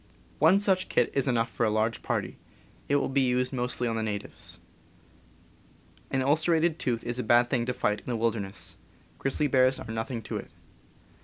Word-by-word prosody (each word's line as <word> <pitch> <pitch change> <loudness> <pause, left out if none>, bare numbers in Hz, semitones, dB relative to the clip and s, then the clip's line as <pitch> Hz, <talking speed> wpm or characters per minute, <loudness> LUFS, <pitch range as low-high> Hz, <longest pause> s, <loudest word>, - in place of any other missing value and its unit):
One 195 - +6
such 190 -2 +1
kit 125 - +2
is 140 -1 +1
enough 115 -3 +2
for 120 - -1
a 110 - +3
large 110 +1 0
party. - - -2 0.5
It 140 - +3
will 145 - +2
be 135 +1 +1
used 125 0 +1
mostly 125 -1 -1
on 115 -1 -1
the - - -1
natives. 105 -2 -5 1.5
An 135 -1 0
ulcerated 160 +3 +2
tooth 120 -3 -1
is 120 +1 -4
a - - -1
bad 120 +2 +4
thing 120 -2 +1
to 125 - 0
fight 105 0 0
in - - -21
the 125 - -1
wil 115 +1 +2
derness 100 -4 -5 0.2
— - - -31
grizzly 135 +2 0
bears 130 -1 +3
are 110 - -7
nothing 115 +1 -3
to - - -4
it. - - -8
125 Hz, 200 wpm, -28 LUFS, 115-135 Hz, 1.5 s, One